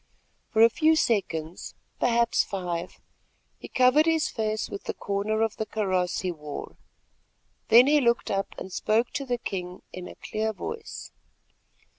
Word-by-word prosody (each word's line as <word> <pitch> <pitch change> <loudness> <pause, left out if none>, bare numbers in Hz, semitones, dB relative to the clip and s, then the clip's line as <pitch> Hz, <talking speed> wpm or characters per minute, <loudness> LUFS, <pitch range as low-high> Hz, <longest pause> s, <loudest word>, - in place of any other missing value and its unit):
For 225 -1 +4
a 230 - +8
few 315 +5 +4
seconds, 175 - -1 0.2
perhaps 235 -1 +3
five, 175 -3 -4 0.6
he - - -9
covered 260 +5 +4
his 325 -1 +2
face 215 -1 -2
with 200 - -8
the - - -3
corner 205 +2 -1
of 225 -1 -1
the 220 - -2
kaross 185 -4 0
he 185 - -1
wore, 150 -3 -8 0.9
then 235 +3 +8
he 295 +1 +4
looked 235 -2 +1
up 195 0 -2
and 190 - -7
spoke 225 +3 +1
to 275 - -4
the 245 -1 0
king 180 -5 -5
in 185 -1 -7
a - - -10
clear 220 0 -3
voice. 445 - -7
220 Hz, 155 wpm, -27 LUFS, 185-240 Hz, 0.9 s, a